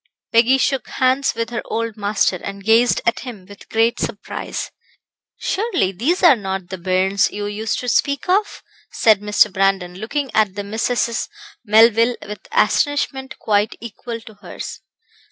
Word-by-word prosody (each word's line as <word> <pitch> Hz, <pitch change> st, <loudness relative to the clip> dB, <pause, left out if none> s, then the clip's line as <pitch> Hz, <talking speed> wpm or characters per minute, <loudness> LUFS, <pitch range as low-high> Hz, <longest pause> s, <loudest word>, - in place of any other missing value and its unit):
Peggy 235 Hz, +3 st, +5 dB
shook 270 Hz, 0 st, 0 dB
hands 260 Hz, +1 st, +1 dB
with 230 Hz, 0 st, -3 dB
her 235 Hz, -, -2 dB
old 230 Hz, -1 st, -3 dB
master, 205 Hz, -3 st, +1 dB
and 200 Hz, +2 st, -8 dB
gazed 225 Hz, +3 st, +3 dB
at 235 Hz, -, +1 dB
him 235 Hz, -7 st, -9 dB
with 205 Hz, 0 st, -14 dB
great 225 Hz, +1 st, +1 dB
surprise. 205 Hz, -3 st, -5 dB, 0.7 s
"Surely, 390 Hz, -, 0 dB
these 265 Hz, -, -1 dB
are 325 Hz, -6 st, +8 dB
not 190 Hz, -4 st, -5 dB
the 190 Hz, -, -5 dB
bairns 185 Hz, +2 st, +1 dB
you 205 Hz, 0 st, -4 dB
used 210 Hz, +1 st, -2 dB
to 250 Hz, -, -6 dB
speak 280 Hz, +5 st, +1 dB
of?" 400 Hz, +3 st, 0 dB, 0.3 s
said 215 Hz, -3 st, +3 dB
Mr. 210 Hz, -1 st, +3 dB
Brandon, 195 Hz, -2 st, +1 dB
looking 250 Hz, +8 st, -3 dB
at 210 Hz, -3 st, +2 dB
the 205 Hz, -, -4 dB
Misses 230 Hz, +2 st, -1 dB, 0.3 s
Melville 230 Hz, +2 st, +5 dB
with 210 Hz, +1 st, -9 dB
astonishment 290 Hz, -, 0 dB
quite 210 Hz, 0 st, 0 dB
equal 235 Hz, +1 st, -7 dB
to 220 Hz, -, -13 dB
hers. -, -, -8 dB
225 Hz, 155 wpm, -20 LUFS, 200-250 Hz, 0.7 s, are